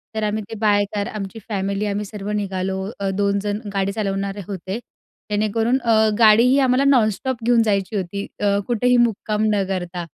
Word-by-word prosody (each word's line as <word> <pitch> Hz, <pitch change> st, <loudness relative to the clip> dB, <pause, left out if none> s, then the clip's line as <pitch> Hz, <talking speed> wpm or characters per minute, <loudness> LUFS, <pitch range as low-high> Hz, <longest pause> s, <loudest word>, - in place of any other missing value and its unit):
तर 220 Hz, -, -1 dB
आम्ही 210 Hz, 0 st, -1 dB
ते 225 Hz, -, -6 dB
बाय 205 Hz, -2 st, +3 dB
कार 205 Hz, 0 st, -1 dB
आमची 210 Hz, +1 st, -6 dB
फॅमिली, 200 Hz, 0 st, -1 dB
आम्ही 205 Hz, 0 st, -2 dB
सर्व 205 Hz, 0 st, -6 dB
निघालो, 190 Hz, -2 st, -2 dB, 0.2 s
अ, 195 Hz, -1 st, -1 dB
2 200 Hz, 0 st, +1 dB
जण 205 Hz, +1 st, -2 dB
गाडी 195 Hz, 0 st, 0 dB
चालवणारे 200 Hz, -1 st, -3 dB
होते. 195 Hz, +2 st, -5 dB, 0.5 s
जेणेकरून 225 Hz, +4 st, +1 dB
अ, 220 Hz, -2 st, +3 dB
गाडीही 230 Hz, +4 st, +6 dB
आम्हाला 260 Hz, 0 st, +3 dB
नॉनस्टॉप 245 Hz, -2 st, +1 dB
घेऊन 240 Hz, -1 st, +4 dB
जायची 200 Hz, 0 st, 0 dB
होती 200 Hz, +1 st, -3 dB
अ, 200 Hz, -1 st, +2 dB
कुठेही 245 Hz, +1 st, +2 dB
मुक्काम 215 Hz, -2 st, +1 dB
न 200 Hz, -1 st, +1 dB
करता. 175 Hz, -2 st, -4 dB
205 Hz, 170 wpm, -21 LUFS, 195-225 Hz, 0.5 s, गाडीही